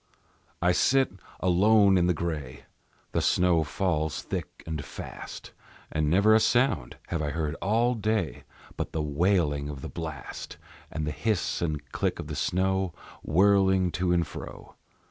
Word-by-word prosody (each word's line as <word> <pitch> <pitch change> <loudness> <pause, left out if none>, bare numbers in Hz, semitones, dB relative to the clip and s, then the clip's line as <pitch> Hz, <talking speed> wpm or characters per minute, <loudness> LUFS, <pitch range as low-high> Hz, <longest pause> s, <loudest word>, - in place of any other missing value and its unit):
I 90 - +5
sit 130 +6 +3 0.3
alone 100 +2 +5
in 90 -1 +3
the 90 - +2
gray, 75 -6 -4 0.5
The - - +1
snow 90 -3 +3
falls 80 -2 -1
thick - - -5
and 80 -3 -4
fast, - - -8 0.4
And 75 -1 0
never 100 +6 +5
a 110 - +6
sound 120 - +1
have 85 -3 -1
I 75 - -1
heard 75 0 -2
all 115 +6 +2
day 110 - -1 0.3
But - - -4
the 80 - -1
wailing 75 -2 +1
of 70 -3 -7
the - - -6
blast, 80 -5 -7 0.3
And 80 - -3
the 75 - -1
hiss 90 +7 -1
and 75 -4 -2
click - - -1
of - - -6
the - - -5
snow, 95 -2 0 0.3
whirling 95 +1 +3
to 90 +2 0
and 85 -1 +2
fro. 75 - -9
90 Hz, 155 wpm, -27 LUFS, 75-95 Hz, 0.5 s, a